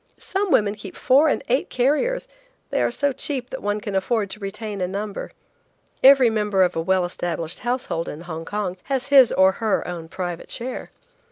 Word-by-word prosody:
Some 390 +1 -2
women 205 -9 +3
keep 205 -2 -10
four 275 +5 +4
and - - 0
eight 255 +4 +1
carriers; 300 - +1 0.4
they - - +1
are - - +2
so 285 -1 0
cheap 255 -2 -3
that 265 - -5
one 205 +1 -1
can 205 -1 -5
afford 200 +1 0
to - - -6
retain 205 0 -5
a 180 - 0
number. 200 +2 -5 0.7
Every 265 -2 +8
member 210 -3 +2
of 180 -1 +1
a 165 - 0
well 185 +1 +2
established 175 -1 -4
household 240 -9 -2
in 150 - -7
Hong 165 -2 -6
Kong 195 0 -3
has 270 0 -2
his 270 -4 +7
or 190 0 +5
her 220 -3 0
own 170 -2 -6
private 175 -1 -5
chair. 250 +2 -4
210 Hz, 190 wpm, -23 LUFS, 185-255 Hz, 0.7 s, Every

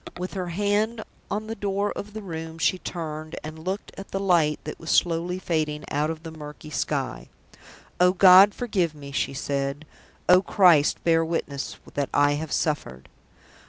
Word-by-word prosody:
With 180 +1 -5
her 185 -2 -3
hand 205 +5 0 0.3
on 210 +1 -2
the 220 - -4
door 200 -1 -1
of 205 +1 -7
the 215 -1 -6
room, 160 -3 -6
she 180 +3 +1
turned 155 -3 -6
and 155 +1 -7
looked 185 +5 -4
at 195 - -9
the 195 - -3
light 170 -6 +2
that 150 - -7
was 165 - -8
slowly 175 +1 +2
fading 155 -4 -2
out 150 +2 0
of 160 0 -5
the 165 - -7
murky 150 -1 -10
sky. - - -2 0.7
"Oh, 180 0 +5
God, 190 +2 +8
forgive 185 -10 -1
me!" 140 -1 -10
she 135 - -1
said. 140 +2 -2 0.4
"Oh, 180 +1 +7
Christ, 175 -7 +4
bear 165 -1 +3
witness 155 -4 -3 0.2
that 140 -1 -1
I 145 0 +4
have 150 +1 -3
suffered!" 70 - -2
165 Hz, 170 wpm, -25 LUFS, 150-190 Hz, 0.7 s, God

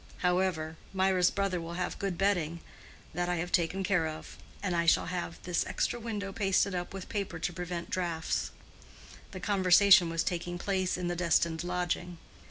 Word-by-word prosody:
However, 180 -3 +1 0.2
Mirah's 190 -1 +3
brother 195 -3 -1
will 165 +1 -6
have 180 0 -3
good 195 -4 -2
bedding—that 175 -1 -3
I 180 - +1
have 175 +1 -3
taken 180 +2 +1
care 180 -5 +2
of; 155 0 -8 0.3
and 185 -3 0
I 170 0 +1
shall - - +5
have 175 -2 -4
this 180 -1 0
extra 240 - -1
window 210 -4 -4
pasted 195 -1 +2
up 175 -1 -3
with 190 -1 -7
paper 200 -5 -3
to 175 - -2
prevent 180 +2 -5
draughts." 175 -5 -1 0.8
(The 185 - -8
conversation 190 -1 +6
was 165 0 0
taking 175 0 -3
place 185 0 -1
in 180 -1 -2
the 175 - -1
destined 170 -1 +1
lodging.) 175 0 -2
180 Hz, 170 wpm, -30 LUFS, 170-190 Hz, 0.8 s, conversation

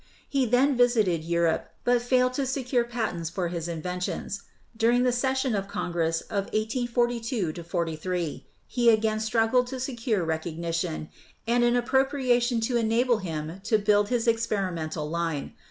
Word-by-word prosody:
He 270 -3 +1
then 260 +4 +3
visited 220 -9 +3
Europe, 170 -1 0
but 245 -1 +3
failed 255 +1 +2
to 270 0 -1
secure 255 -2 0
patents 225 -9 -3
for 175 +1 -2
his 170 -1 -4
inventions. 180 +4 -4 0.3
During 235 +2 +3
the 250 - +3
session 265 +1 0
of 195 -2 -1
Congress 165 -4 -1
of 200 -2 -3
1842 230 -5 -1
43 170 0 -3 0.2
he 240 -2 +2
again 220 -1 +3
struggled 225 +3 +2
to 260 +1 -5
secure 235 -7 -1
recognition 165 0 -3 0.4
and 240 +1 +2
an 240 0 +3
appropriation 245 -1 +2
to 240 +2 +1
enable 235 +1 +2
him 165 -1 -5
to 220 - +3
build 205 0 +3
his 245 -1 0
experimental 185 -9 -1
line. 165 -2 -2
220 Hz, 140 wpm, -27 LUFS, 170-245 Hz, 0.4 s, then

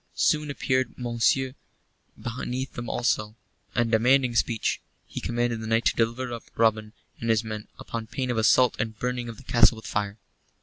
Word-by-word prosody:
Soon 150 -1 +2
appeared 130 -2 0
Monceux 125 +2 +1 0.7
beneath 125 +2 -4
them 120 0 -6
alone, 110 -3 0 0.4
and 120 -1 +1
demanding 125 +2 +4
speech. 115 -1 +1 0.2
He - - -6
commanded 120 -1 -1
the 110 - -5
knight 115 +1 +2
to - - +3
deliver 120 +2 0
up 115 - -7
Robin 110 -1 +2 0.3
and 115 - -3
his 110 0 +3
men 110 -1 -6
upon 115 -1 -5
pain 125 +2 -2
of 120 - -2
assault 125 +3 +5
and 110 -1 -2
burning 125 0 -2
of 115 - -8
the 135 - -13
castle 120 -2 +5
with 110 -2 -11
fire. 100 0 -2
120 Hz, 175 wpm, -26 LUFS, 110-125 Hz, 0.7 s, assault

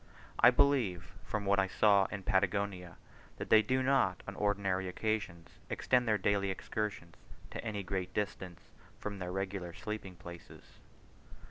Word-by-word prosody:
I - - +9
believe, 125 - +2
from 105 -2 -3
what 100 0 +3
I 95 - +2
saw 100 0 +4
in 100 -1 -6
Patagonia, 95 -2 0 0.4
that - - -6
they 110 - +8
do 130 +4 0
not 130 -9 +2
on 100 - -5
ordinary 95 -2 0
occasions 90 -3 -3
extend 125 -2 +1
their 110 -1 +3
daily 100 0 +1
excursions 95 -2 -4 0.3
to - - -5
any 105 -3 -3
great 95 0 -3
distance 95 -4 -4 0.4
from 100 -1 -5
their 90 -1 -4
regular 95 -2 -3
sleeping 105 -2 -6
places. 85 0 -11
100 Hz, 145 wpm, -33 LUFS, 90-105 Hz, 0.4 s, I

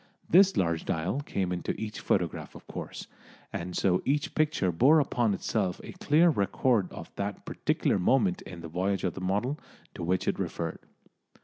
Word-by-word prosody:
This 190 +2 +6
large 85 -2 +1
dial 90 - -1
came 95 -10 -2
into 90 -1 -3
each 110 0 -5
photograph, 90 -5 -1
of - - -12
course, - - -7 0.5
and 90 +1 -4
so 90 -1 +2
each 145 +2 0
picture 150 - +1
bore 135 - +5
upon 120 -7 +1
itself 95 -4 -1
a - - -8
clear 160 +4 +4
record 105 - +1
of - - -9
that 100 0 -4
particular - - 0
moment 160 - +2
in 90 -2 -9
the 85 - -6
voyage 95 +3 -1
of 90 -3 0
the 95 - -7
model 105 +10 -1 0.3
to - - -8
which 90 +2 0
it - - 0
referred. - - -3
100 Hz, 175 wpm, -29 LUFS, 90-135 Hz, 0.5 s, This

